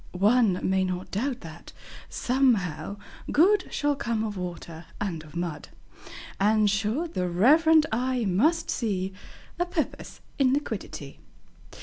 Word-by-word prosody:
One 205 0 +3
may 190 0 +2
not 185 0 -4
doubt 250 +5 -2
that, 165 +1 -11 0.4
somehow, 205 - 0 0.3
Good 375 +5 +3
Shall 290 0 0
come 230 -4 -2
of 215 -2 -3
Water 170 -2 -7
and 180 -6 -3
of 155 +1 -15
Mud; 170 -3 -4 0.7
And, 210 +1 +3
sure, 215 - 0
the 180 - -2
reverent 305 - +5
eye 250 +1 0
must 305 - +2
see 195 -5 -2 0.5
A 350 - +2
Purpose 340 -3 -4 0.2
in 260 -2 +4
Liquidity. 290 +1 -4
215 Hz, 125 wpm, -26 LUFS, 180-270 Hz, 0.7 s, reverent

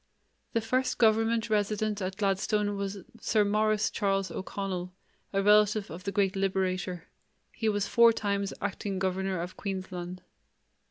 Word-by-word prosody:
The 230 - +2
first 255 +4 0
government 225 0 +3
resident 210 -1 0
at 185 0 -3
Gladstone 205 +1 +1
was 200 -1 -4 0.2
Sir 215 -2 +2
Maurice 215 +1 +2
Charles 195 -2 0
O'Connell, 190 -2 -4 0.4
a 195 0 +1
relative 210 0 +4
of 175 +4 -8
the 200 - -1
great 195 -1 +1
Liberator; 185 -2 -1 0.5
he 225 -2 -1
was 205 -1 0
four 235 0 +6
times 200 -2 -1
acting 200 0 -3
governor 190 0 -1
of 175 +2 -5
Queensland. 185 -2 -5
200 Hz, 140 wpm, -29 LUFS, 190-215 Hz, 0.5 s, four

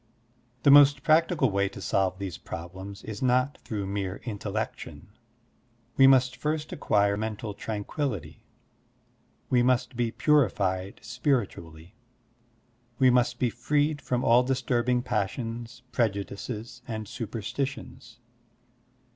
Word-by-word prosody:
The 140 - +6
most 145 -1 +7
practical 155 -5 +3
way 100 0 +1
to - - -10
solve 95 -1 0
these 95 -8 -6
problems 95 +4 -8
is 105 -2 -7
not 130 +2 +1
through 105 -3 -4
mere 95 -1 -3
intellection. 110 -1 -5 0.9
We 135 - +7
must 130 -1 +4
first 150 +3 -3
acquire 100 -6 +2
mental 110 0 -4
tranquillity, 105 - -4 1.1
we 125 -1 +4
must 125 +1 +1
be 120 -1 0
ptirified 100 -11 +1
spiritually, 105 - -2 1.0
we 130 -2 +5
must 125 0 +2
be 120 -2 0
freed 145 +5 0
from 125 0 -1
all 120 +2 +5
disttirbing 125 -1 0
passions, 115 +2 -3
prejudices, 110 +2 -3
and 110 -2 -5
superstitions. 115 +1 -5
120 Hz, 110 wpm, -27 LUFS, 100-130 Hz, 1.1 s, most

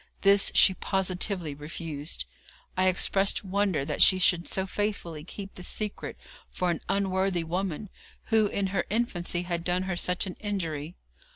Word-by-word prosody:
This 200 0 +5
she 190 - +7
positively 185 -3 -1
refused. 150 - -4 0.5
I 185 0 +3
expressed 195 +2 +2
wonder 195 -6 0
that 150 0 -2
she 185 - +8
should 175 -1 +3
so 190 - -1
faithfully 190 -6 -3
keep 195 +3 -8
this 180 - -5
secret 210 -1 -4 0.3
for 180 -1 0
an 170 - -3
unworthy 190 -2 +1
woman, 180 +3 -2 0.4
who 220 -1 +5
in 200 -1 -1
her - - +1
infancy 180 -6 0
had 170 -1 -2
done 180 +1 0
her 190 -1 -2
such 180 +2 +1
an 185 - -6
injury. 170 -6 -3
185 Hz, 155 wpm, -28 LUFS, 170-195 Hz, 0.5 s, she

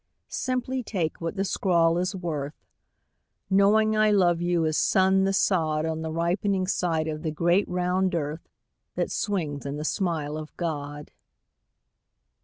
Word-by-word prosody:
Simply 255 0 -2
take 180 -10 -3
what 165 +3 -3
the 195 0 -1
scrawl 170 -3 +2
is 185 +2 -1
worth 155 -5 -4 1.0
Knowing 215 +3 +4
I 215 0 +4
love 175 -5 +3
you 175 -1 +1
as 155 -1 0
sun 190 +2 +3
the 195 - +2
sod 160 -6 +1
On 160 0 -2
the 160 - -3
ripening 185 +4 0
side 165 -4 0
of 155 -1 -4
the 160 - -2
great 175 +5 +1
round 180 +1 0
earth 155 0 -4 0.5
That - - -1
swings 160 -9 -2
in 140 +1 -4
the 150 - -4
smile 160 -5 -1
of 155 0 -9
God. 145 -3 -4
175 Hz, 150 wpm, -26 LUFS, 155-190 Hz, 1.0 s, Knowing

